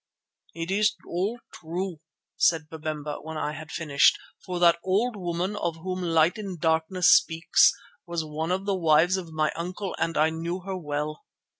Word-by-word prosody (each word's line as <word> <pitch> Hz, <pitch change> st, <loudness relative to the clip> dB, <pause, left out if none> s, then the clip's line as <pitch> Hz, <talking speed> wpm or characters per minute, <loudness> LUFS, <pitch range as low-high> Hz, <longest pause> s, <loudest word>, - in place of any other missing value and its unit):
"It 165 Hz, +2 st, -4 dB
is 210 Hz, +1 st, +2 dB
all 200 Hz, +7 st, -2 dB
true," 175 Hz, +1 st, -5 dB, 0.4 s
said 160 Hz, -2 st, +2 dB
Babemba 155 Hz, -2 st, -4 dB
when 160 Hz, +1 st, -7 dB
I 150 Hz, -, -2 dB
had 155 Hz, +1 st, -9 dB
finished, 145 Hz, -3 st, +3 dB, 0.3 s
"for 180 Hz, -2 st, -4 dB
that 170 Hz, -1 st, +5 dB
old 215 Hz, +6 st, +1 dB
woman 180 Hz, +1 st, -2 dB
of 170 Hz, -5 st, -2 dB
whom 185 Hz, +3 st, -4 dB
Light 170 Hz, +4 st, +2 dB
in 200 Hz, -3 st, -5 dB
the -, -, -9 dB
Darkness 160 Hz, +3 st, +2 dB
speaks, 165 Hz, 0 st, +4 dB, 0.4 s
was 170 Hz, -2 st, -2 dB
one 155 Hz, +2 st, -3 dB
of 190 Hz, +2 st, -1 dB
the 200 Hz, -, +1 dB
wives 170 Hz, +1 st, +4 dB
of 175 Hz, -4 st, -5 dB
my 155 Hz, -1 st, 0 dB
uncle 180 Hz, +4 st, -4 dB
and 165 Hz, -, -1 dB
I 155 Hz, +1 st, +3 dB
knew 170 Hz, +3 st, -4 dB
her 190 Hz, +1 st, -5 dB
well. 150 Hz, -2 st, -4 dB
170 Hz, 175 wpm, -26 LUFS, 160-185 Hz, 0.4 s, that